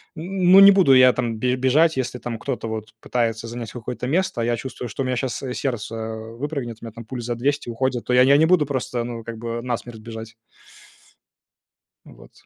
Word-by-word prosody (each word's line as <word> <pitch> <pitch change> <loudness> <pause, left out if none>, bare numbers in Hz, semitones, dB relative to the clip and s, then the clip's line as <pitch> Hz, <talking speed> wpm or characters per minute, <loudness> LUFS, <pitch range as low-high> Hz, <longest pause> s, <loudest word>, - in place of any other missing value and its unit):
н 155 - -7 0.3
ну, 195 - +10
не 200 0 +10
буду 185 -9 +5
я 130 0 +7
там 115 -3 -2
бе 125 +1 +1
бежать, 145 +5 +3
если 125 -1 -2
там 115 -2 -5
кто-то 125 -4 -4
вот 110 -1 -6
пытается 115 -2 -1
занять 115 -1 -6
какое-то 125 0 -5
место, 180 -3 0
а - - 0
я 120 0 +1
чувствую, 125 0 -6
что 135 +6 -3
у - - -3
меня 125 -1 -1
щас, 130 +1 -3
э, 125 -1 -3
сердце 115 -4 -3 0.2
выпрыгнет, 120 +2 -5
у - - -9
меня 115 - -8
там 115 - -9
пульс 120 0 -6
за 120 0 -2
200 140 +3 -1
уходит, 125 +1 -2
то 125 - -1
я 125 - +6
я 140 +2 +6
не 160 - +5
буду 170 -4 +4
просто, 125 -3 -2
ну, 115 -2 -6
как 115 -1 -6
бы 115 +1 -4
насмерть 120 -2 -5
бежать. 115 0 -9 1.7
Ну, - - -14
вот, - - -17
120 Hz, 220 wpm, -22 LUFS, 115-135 Hz, 1.7 s, ну